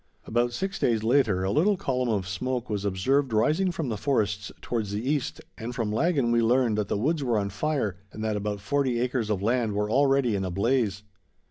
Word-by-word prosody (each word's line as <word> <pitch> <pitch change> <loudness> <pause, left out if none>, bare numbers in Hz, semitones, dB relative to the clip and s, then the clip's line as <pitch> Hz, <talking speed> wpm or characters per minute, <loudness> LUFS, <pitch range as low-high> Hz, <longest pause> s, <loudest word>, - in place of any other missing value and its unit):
About 120 +1 +1
six 195 +10 -3
days 115 -3 +1
later, 110 -6 +2
a 95 - 0
little 195 - +3
column 130 -9 -1
of 100 -4 0
smoke 125 +5 -3
was 105 -1 -2
observed 130 +8 +1
rising 155 - +2
from 160 -6 -3
the 110 - -2
forests 105 -6 0
towards 110 -4 -3
the 105 +5 -3
east, 145 -2 -1 0.2
and 120 +2 -5
from 115 -4 -1
Laggan 135 0 +1
we 120 0 +3
learned 120 -1 +3
that 105 - -1
the - - -1
woods 145 +7 0
were 120 -4 +1
on 100 -1 -1
fire, 125 - -1
and 110 - -7
that 110 -1 0
about 105 -1 -3
forty 130 +1 0
acres 120 -2 -1
of 100 -2 -1
land 115 -1 +1
were 105 +1 -1
already 135 -2 +3
in 95 - -1
a 95 - -2
blaze. 100 0 0
115 Hz, 215 wpm, -26 LUFS, 105-135 Hz, 0.2 s, little